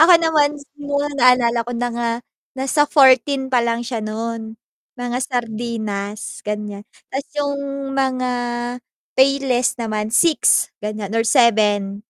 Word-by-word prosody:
Ako 335 +3 +8
naman 300 -3 +2 0.2
mo 285 0 -1 0.2
naalala 245 -2 +4
ko 245 - -4
na 245 +1 -1
nga 235 0 -1 0.5
nasa 275 +3 +2
14 265 -1 +4
pa 245 - +4
lang 235 0 -1
siya 235 -2 -3
nun, 220 +1 -5 0.4
mga 245 0 -2
sardinas 220 -4 -4
ganyan, 210 -1 -5 0.3
tas 270 +1 -2
yung 285 -1 0 0.4
mga 255 -2 0 0.8
payless 265 -2 +2
naman 215 -2 -2
6 325 +4 +3
ganyan 210 -1 -4
or 225 - +3
7. 210 -5 +2
240 Hz, 125 wpm, -20 LUFS, 215-270 Hz, 0.8 s, Ako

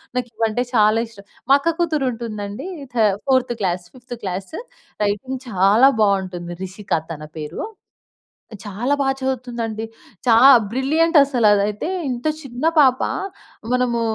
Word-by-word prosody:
నాకివంటే 230 -1 -1
చాలా 215 -1 +4
ఇష్టం 205 -3 -16 0.2
మా 275 - +8
అక్క 330 +3 -1
కూతురుంటుందండి. 235 - -3 0.3
థ - - -7 0.3
fourth 260 -2 +2
class 180 -1 -1
fifth 245 -1 -9
class. 190 - -5 0.5
Writing 255 +6 -2
చాలా 205 +6 +5
బావుంటుంది. 185 -4 0
రిషిక 190 +2 -6 0.2
తన 155 -2 -7
పేరు. 155 +1 -6 1.0
చాలా 220 +7 -2
బా 275 - +1
చదువుతుందండి. 240 -4 -3 0.4
చా 235 -2 +5 0.4
బ్రిలియంటసలదైతే, 265 - +2 0.2
ఇంత 245 +1 -5 0.2
చిన్న 260 0 -6
పాప, 260 -4 +5 0.7
మనమూ 250 -2 +1
230 Hz, 110 wpm, -20 LUFS, 205-260 Hz, 1.0 s, మా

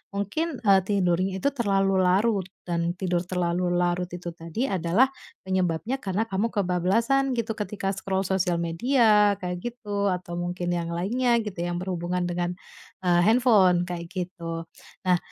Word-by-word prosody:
mungkin, 250 - -2
eee, 195 -3 +6
tidurnya 185 -2 +1
itu 280 - +3
terlalu 195 -6 +1
larut 190 +1 +2 0.2
dan 170 0 -1
tidur 180 -2 -1
terlalu 180 -1 0
larut 175 0 0
itu 175 -1 -6
tadi 165 +7 -4
adalah 190 +8 +2 0.3
penyebabnya 190 +6 -1
karena 200 +1 -1
kamu 195 +4 0
kebablasan 215 +9 +1
gitu 230 -1 -1
ketika 205 -2 -2
scroll 190 0 -2
sosial 180 -2 +1
media 210 +3 +3
kayak 180 -1 -3
gitu 205 -4 -3
atau 180 -1 -3
mungkin 175 0 -2
yang 170 -1 -2
lainnya 235 +8 +1
gitu 205 -3 -6
yang 175 0 -2
berhubungan 180 -1 -2
dengan, 175 0 -1 0.5
eee, 175 -1 +3
handphone, 210 -7 +4
kayak 175 -1 -5
gitu. 170 -2 -5 0.4
Nah, 180 -1 +5
185 Hz, 145 wpm, -26 LUFS, 175-210 Hz, 0.5 s, eee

